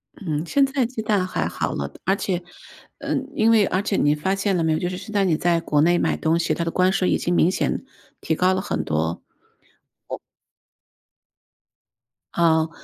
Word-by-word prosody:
嗯， 155 -5 -3
现 275 - +3
在 270 -2 0
鸡 235 -1 -5
蛋 205 -4 +1
还 - - -1
好 - - -2
了， 70 0 -4
而 195 +2 +3
且 185 -3 -2 0.6
嗯， 270 +1 -3
因 225 -4 +4
为 215 -3 +5
而 185 - 0
且 200 - -1
你 145 +1 +3
发 190 +6 -1
现 195 -1 0
了 165 - 0
没 160 -1 +2
有， 155 - 0
就 175 - -1
是 180 - -5
现 215 +3 -9
在 200 -1 +2
你 180 -4 +2
在 170 -1 +2
国 150 -2 +1
内 175 +2 +4
买 - - 0
东 165 +1 +1
西， 165 - 0
它 170 - -2
的 165 - -1
关 185 +1 +3
税 185 -1 +1
已 - - +2
经 175 - -1
明 175 - +4
显 - - -1 0.4
提 160 - 0
高 185 +3 +3
了 185 - -1
很 - - -2
多。 80 +2 -1 0.9
我 - - -5 2.2
嗯。 160 -1 +3
180 Hz, 220 characters per minute, -23 LUFS, 160-200 Hz, 2.2 s, 为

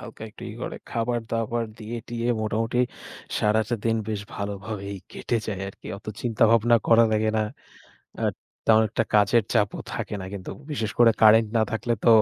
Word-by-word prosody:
হালকা 115 - -10
একটু - - -14
ইয়ে 110 - -8
করে, - - -4
খাবারদাবার 115 0 -1
দিয়ে 115 +2 -5
টিয়ে 120 0 -2
মোটামুটি 115 +3 -1 0.6
সারাটা 110 +2 +2
দিন 115 0 +2
বেশ 105 -2 -2
ভালোভাবেই 100 0 -5 0.2
কেটে 120 - -1
যায় 100 -3 -3
আরকি। - - -12
অত 110 - -22
চিন্তা 115 -2 0
ভাবনা 115 +1 +5
করা 115 0 +7
লাগে 110 0 +2
না। 110 - +3 0.8
আর - - +2 0.3
তেমন 110 0 +6
একটা - - 0
কাজের 105 +2 +5
চাপও 100 -1 +1
থাকে - - -4
না। - - -5
কিন্তু 95 -2 -6 0.2
বিশেষ 110 -7 -2
করে 120 -1 +7
কারেন্ট 110 0 +7
না 110 - +4
থাকলে 120 +1 -1
তো। - - +5
110 Hz, 170 wpm, -25 LUFS, 105-115 Hz, 0.8 s, করা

